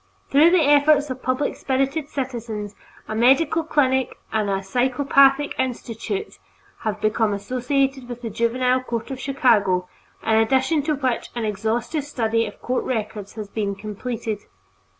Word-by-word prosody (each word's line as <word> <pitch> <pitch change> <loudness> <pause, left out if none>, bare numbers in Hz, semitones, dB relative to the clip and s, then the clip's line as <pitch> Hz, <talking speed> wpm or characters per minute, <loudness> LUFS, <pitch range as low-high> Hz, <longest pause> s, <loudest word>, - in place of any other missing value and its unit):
Through 295 +4 +7
the 350 -2 +4
efforts 290 0 +4
of 255 0 -6
public 255 +3 -1
spirited 275 +3 -1
citizens 230 -6 -4 0.3
a - - -4
medical 275 +8 +3
clinic 265 -4 +1 0.2
and 215 -2 +1
a 195 0 -1
Psychopathic 270 +5 +3
Institute 255 - -3 0.4
have 215 -1 -3
become 215 0 +1
associated 255 +4 -1
with 245 0 -7
the 230 - -4
Juvenile 250 +3 +1
Court 235 0 -4
of 265 - -5
Chicago, 220 -10 +2 0.4
in 220 - +3
addition 265 +7 +2
to 305 -1 +1
which 260 -4 -1
an 235 -2 -2
exhaustive 220 +8 -1
study 230 -5 0
of 205 - -12
court 250 +1 -1
records 215 -4 -4
has 215 -2 -6
been 200 -1 -2
completed. 215 +1 -4
250 Hz, 145 wpm, -22 LUFS, 220-275 Hz, 0.4 s, Through